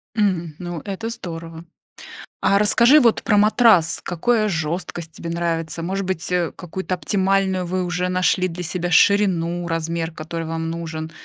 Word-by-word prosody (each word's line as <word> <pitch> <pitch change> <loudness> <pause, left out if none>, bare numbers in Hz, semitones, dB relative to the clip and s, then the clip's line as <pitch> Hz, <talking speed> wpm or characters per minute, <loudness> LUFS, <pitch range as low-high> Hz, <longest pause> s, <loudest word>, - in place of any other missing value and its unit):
Мгм, 185 -7 0
ну, 175 -2 -5
это 205 +3 -4
здорово. 165 -7 -7 0.8
А 200 - +3
расскажи 235 +7 +6
вот 235 -5 +3
про 210 - +2
матрас. 210 -5 +4
Какое 215 +5 +1
жёсткость 165 -1 -3
тебе 165 - -7
нравится? 165 -1 -2
Может 190 +3 -3
быть, 180 -2 -3
э, 175 -2 0
какую-то 185 +2 -4
оптимальную 190 0 0
вы 185 +1 -2
уже 180 0 -2
нашли 185 0 +1
для 180 0 -7
себя 175 +1 -3
ширину, 175 -3 +3
размер, 165 0 -2
который 165 +1 -6
вам 165 0 -3
нужен? 160 -1 -5
175 Hz, 150 wpm, -21 LUFS, 165-195 Hz, 0.8 s, расскажи